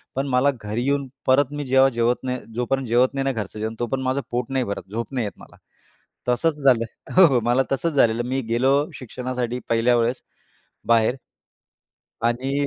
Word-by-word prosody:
पण 135 +1 -1
मला 135 +2 +3
घरी 105 +3 -3
येऊन 140 -1 0 0.2
परत 135 +1 +4
मी 145 -1 -4
जेव्हा 135 +1 +5
जेवत 120 +1 0
नाही 125 -1 -2 0.2
जोपर्यंत 130 +1 -1
जेवत 125 +3 +3
नाही 135 -1 -1
ना, 135 - +2
घरचं 105 -1 -5
जेवण 110 +1 -3
तो 120 - -1
पण 135 +3 -2
माझं 130 +2 0
पोट 120 +1 -2
नाही, 130 -2 0
भरत 100 -1 -5
झोप 115 +4 -4
नाही 120 -4 -1
येतं 100 - -8
मला. - - -17 0.7
तसंच 150 +6 +2
झालं. 120 -4 +5 0.3
हो, 185 -2 +9
हो 130 -5 +2
मला 120 +3 +3
तसंच 165 +4 0
झालेलं, 120 -3 +3
मी 135 +1 0
गेलो 125 +4 +2 0.2
शिक्षणासाठी 125 -1 -4
पहिल्या 115 +1 +3
वेळेस 120 +2 0 0.7
बाहेर. 115 +2 +3 1.1
आणि 135 +4 0
125 Hz, 185 wpm, -23 LUFS, 115-135 Hz, 1.1 s, हो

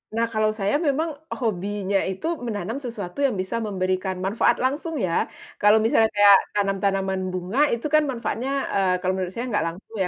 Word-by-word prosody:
Nah 230 0 +1
kalau 215 -1 +1
saya 205 +1 -1
memang 310 0 0 0.2
hobinya 200 -2 -1
itu 190 - -5 0.2
menanam 215 +1 -3
sesuatu 230 +1 -4
yang 255 -6 +2
bisa 225 +5 -2
memberikan 185 -2 -2
manfaat 210 +5 +1
langsung 290 +3 -1
ya. 175 -4 0 0.2
Kalau 210 +2 +5
misalnya 225 0 +3
kayak 205 -1 +7
tanam-tanaman 195 -2 0
bunga, 185 +8 -3
itu 235 +5 -1
kan 305 +1 +4
manfaatnya, 245 +1 -3 0.3
eee, 190 -2 +2
kalau 185 0 0
menurut 185 -1 -3
saya 240 +2 -3
enggak 210 -8 0
langsung 190 +6 -9
ya, - - 0
205 Hz, 175 wpm, -24 LUFS, 190-235 Hz, 0.3 s, kayak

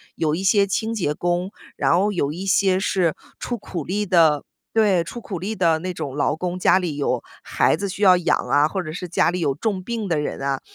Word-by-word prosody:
有 155 -1 0
一 185 - -4
些 200 +1 +4
清 220 +4 -1
洁 175 -9 -1
工， 175 +4 -1 0.3
然 170 - +3
后 205 +3 +2
有 145 -7 -1
一 180 +5 -6
些 190 -1 +3
是 185 -4 +1 0.2
出 240 - -3
苦 170 -4 -5
力 205 +7 -2
的 160 -5 +4 0.3
对， 205 -6 +3
出 205 +8 -8
苦 195 -5 -6
力 205 +5 -4
的 165 -4 +2
那 185 +2 -4
种 140 -5 -5
劳 145 +1 +1
工， 180 +2 -3
家 185 - +4
里 175 -5 -3
有 135 -4 -1 0.2
孩 - - +2
子 200 +4 -4
需 190 +2 -7
要 185 -2 +7
养 175 - +2
啊， 145 +1 +4
或 190 +4 -3
者 155 -3 -6
是 180 +1 -5
家 165 - +2
里 180 +1 -2
有 145 -5 +1
重 200 -1 -2
病 225 0 -3
的 165 -4 0
人 150 - -4
啊。 135 -1 -1
180 Hz, 250 characters per minute, -22 LUFS, 160-195 Hz, 0.3 s, 要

